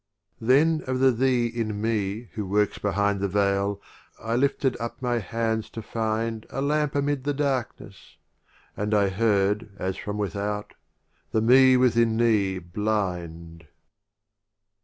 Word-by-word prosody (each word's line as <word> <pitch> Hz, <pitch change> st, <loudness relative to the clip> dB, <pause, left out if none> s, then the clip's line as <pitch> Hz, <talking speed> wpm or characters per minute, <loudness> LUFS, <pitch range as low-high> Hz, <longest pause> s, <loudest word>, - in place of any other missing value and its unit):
XXXIV. 110 Hz, -, -7 dB
Then 155 Hz, +5 st, +4 dB
of 130 Hz, 0 st, -1 dB
the 135 Hz, 0 st, +5 dB
Thee 125 Hz, 0 st, +1 dB
in 115 Hz, -3 st, -3 dB
Me 110 Hz, 0 st, -2 dB
who 105 Hz, -, -3 dB
works 105 Hz, +1 st, +1 dB
behind 100 Hz, 0 st, 0 dB
The 100 Hz, -, 0 dB
Veil, 100 Hz, 0 st, 0 dB, 0.4 s
I 115 Hz, +1 st, -2 dB
lifted 135 Hz, 0 st, +1 dB
up 115 Hz, 0 st, -5 dB
my 120 Hz, -2 st, 0 dB
hands 110 Hz, 0 st, -2 dB
to 115 Hz, -, -8 dB
find 110 Hz, 0 st, -2 dB
A -, -, -5 dB
Lamp 150 Hz, +1 st, 0 dB
amid 140 Hz, -1 st, 0 dB
the 145 Hz, 0 st, -1 dB
Darkness; 135 Hz, -4 st, -4 dB, 0.6 s
and 105 Hz, +1 st, -1 dB
I 100 Hz, -1 st, +3 dB
heard, 105 Hz, +1 st, +1 dB
As 95 Hz, 0 st, -3 dB
from 105 Hz, 0 st, -5 dB
Without 105 Hz, 0 st, -3 dB, 0.3 s
— -, -, -43 dB
"The 110 Hz, -, +2 dB
Me 130 Hz, +2 st, +6 dB
within 115 Hz, -3 st, +3 dB
Thee 105 Hz, -5 st, +2 dB
blind 85 Hz, -4 st, -4 dB
110 Hz, 145 wpm, -25 LUFS, 100-125 Hz, 0.6 s, Me